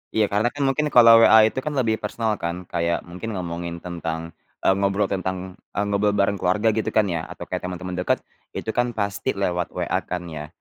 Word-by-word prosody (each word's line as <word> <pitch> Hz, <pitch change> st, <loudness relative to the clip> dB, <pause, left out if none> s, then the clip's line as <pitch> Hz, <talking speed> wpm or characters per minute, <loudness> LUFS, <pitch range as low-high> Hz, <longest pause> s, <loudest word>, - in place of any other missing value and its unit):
Iya 105 Hz, -2 st, +2 dB
karena 105 Hz, +3 st, +2 dB
kan 145 Hz, +3 st, -3 dB
mungkin 140 Hz, +3 st, +1 dB
kalau 115 Hz, -4 st, +8 dB
WA 110 Hz, -1 st, +8 dB
itu 130 Hz, -, -3 dB
kan 150 Hz, +2 st, -4 dB
lebih 115 Hz, -5 st, +1 dB
personal 110 Hz, +1 st, -2 dB
kan, 85 Hz, +2 st, -4 dB
kayak 85 Hz, 0 st, 0 dB
mungkin 90 Hz, +6 st, -7 dB
ngomongin 85 Hz, -1 st, -4 dB
tentang, 85 Hz, -2 st, -5 dB, 0.3 s
eee, -, -, +5 dB
ngobrol 100 Hz, +1 st, +1 dB
tentang, 95 Hz, 0 st, -4 dB, 0.2 s
eee 100 Hz, -, +1 dB
ngobrol 100 Hz, 0 st, +1 dB
bareng 100 Hz, 0 st, +1 dB
keluarga 105 Hz, +5 st, +2 dB
gitu 110 Hz, 0 st, -1 dB
kan 110 Hz, -, +5 dB
ya 80 Hz, -1 st, -3 dB
atau -, -, -8 dB
kayak -, -, -4 dB
temen-temen 90 Hz, 0 st, -5 dB
deket, 90 Hz, -, 0 dB, 0.3 s
itu 110 Hz, -, -3 dB
kan 120 Hz, 0 st, -1 dB
pasti 100 Hz, +4 st, -2 dB
lewat 90 Hz, -3 st, -1 dB
WA -, -, 0 dB
kan 90 Hz, -1 st, -3 dB
ya. 75 Hz, -1 st, -6 dB
100 Hz, 205 wpm, -23 LUFS, 90-110 Hz, 0.3 s, kalau